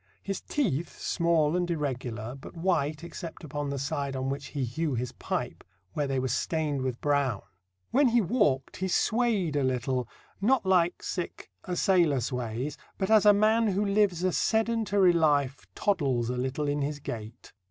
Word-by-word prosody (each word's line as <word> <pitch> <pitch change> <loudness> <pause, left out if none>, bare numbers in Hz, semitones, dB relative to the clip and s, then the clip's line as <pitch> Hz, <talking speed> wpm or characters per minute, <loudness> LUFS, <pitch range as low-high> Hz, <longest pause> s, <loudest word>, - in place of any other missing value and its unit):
His 195 -1 -3
teeth, 175 - -1
small 170 -3 +1
and 175 -1 0
irregular, 125 -7 -3
but 135 +5 -11
white 155 -3 0
except 170 0 -8
upon 145 -1 -4
the 140 - -3
side 140 0 -2
on 130 0 -2
which 140 +1 -4
he 140 -3 -3
hew 145 +4 -2
his 125 +1 -2
pipe, - - -4 0.3
where 145 -1 -1
they 135 -1 -1
were 130 0 0
stained 145 +2 -1
with 130 -2 -2
brown. 140 -7 +1 0.5
When 275 +2 +4
he 240 0 +4
walked 165 - +1
he 190 - -1
swayed 210 -5 +1
a 145 - +2
little, 130 -1 0 0.3
not 240 +1 +3
like 180 -2 +2 0.6
a 180 - -2
sailor 170 -7 +3
sways, 125 +2 -3 0.2
but 190 +2 -1
as 215 -1 +6
a - - +10
man 220 +2 +3
who 205 +1 +1
lives 200 -3 +2
a 185 - +2
sedentary 220 -4 +2
life 145 -5 +1
toddles 135 - +1
a - - -2
little 130 +4 -2
in 145 0 0
his 145 +1 -2
gait. 115 -4 -8
150 Hz, 170 wpm, -28 LUFS, 130-190 Hz, 0.6 s, a